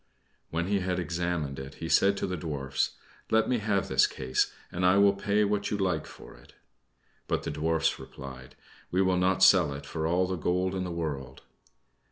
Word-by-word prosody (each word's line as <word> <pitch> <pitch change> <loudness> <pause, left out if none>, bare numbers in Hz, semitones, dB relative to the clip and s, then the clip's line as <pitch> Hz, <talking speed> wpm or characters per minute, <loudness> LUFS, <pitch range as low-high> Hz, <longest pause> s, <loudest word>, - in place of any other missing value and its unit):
When 85 +1 -1
he 100 +1 +1
had 90 -1 -1
examined 85 -5 -2
it, 65 +2 -8
he 80 - -6
said 100 +4 +4
to - - -1
the 90 -1 -3
Dwarfs, 70 -5 -2 0.3
"Let 110 0 +3
me 125 -2 +1
have 105 -2 0
this - - +4
case, 65 0 -1 0.2
and 90 - -3
I 90 +2 +5
will 100 0 +6
pay 100 +1 +1
what 105 0 0
you 105 - -1
like 90 -6 -1
for - - -13
it." - - -19 0.7
But - - -1
the - - -3
Dwarfs 80 +2 0
replied, 65 -1 -10 0.3
"We 95 +2 +2
will 95 -1 +2
not 95 +1 +2
sell 90 -6 +6
it 70 0 -8
for 80 +2 -3
all 90 +2 +2
the 95 0 -3
gold 90 +3 0
in 95 -1 -2
the 90 - -4
world." 70 -6 -5
90 Hz, 200 wpm, -28 LUFS, 75-95 Hz, 0.7 s, will